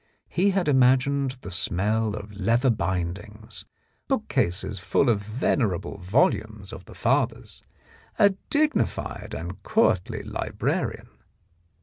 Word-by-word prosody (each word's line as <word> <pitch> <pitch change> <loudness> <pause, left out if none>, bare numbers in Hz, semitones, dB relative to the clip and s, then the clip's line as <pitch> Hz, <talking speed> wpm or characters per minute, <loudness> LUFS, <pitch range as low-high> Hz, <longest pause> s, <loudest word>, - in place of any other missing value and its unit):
He 190 +3 +2
had 190 -3 0
imagined 135 0 +3
the 100 - -7
smell 105 +4 +1
of 105 0 -8
leather 115 +6 +2
bindings, 105 +3 -4 0.4
bookcases 90 +3 -1
full 120 +8 +2
of 105 -3 +2
venerable 105 - -1
volumes 110 - 0
of - - -9
the - - -13
fathers, - - 0 0.6
a 200 - +6 0.2
dignified 305 +1 0
and - - -7
courtly 220 - +1
librarian. - - -3
110 Hz, 105 wpm, -25 LUFS, 100-135 Hz, 0.6 s, a